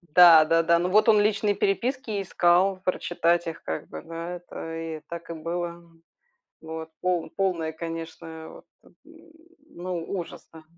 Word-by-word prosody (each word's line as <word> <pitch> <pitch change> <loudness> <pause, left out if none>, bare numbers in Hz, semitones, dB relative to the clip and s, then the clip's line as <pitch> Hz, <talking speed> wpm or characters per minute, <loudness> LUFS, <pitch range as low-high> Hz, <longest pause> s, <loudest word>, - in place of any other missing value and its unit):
Да-да-да, 165 -1 +7
ну 175 +1 0
вот 215 +4 +4
он 215 -1 +6
личные 205 0 +2
переписки 240 +5 -1
и 200 - -1
искал, 185 +1 +3
прочитать 175 -1 +1
их 165 - -5
как 80 - -4
бы, 80 - -7
да. 165 +2 -6
Это 165 -2 -8
и 165 -1 -5
так 170 0 -7
и - - -3
было. 170 +1 -4 0.8
Вот 160 0 -7
пол 180 -3 0
полный, 180 -5 0
конечно, 165 -1 -7
вот - - -14 0.2
этот - - -23 0.7
ну, 175 - -5
ужас, 170 - -7
да. 160 -1 -12
170 Hz, 150 wpm, -26 LUFS, 165-185 Hz, 0.8 s, Да-да-да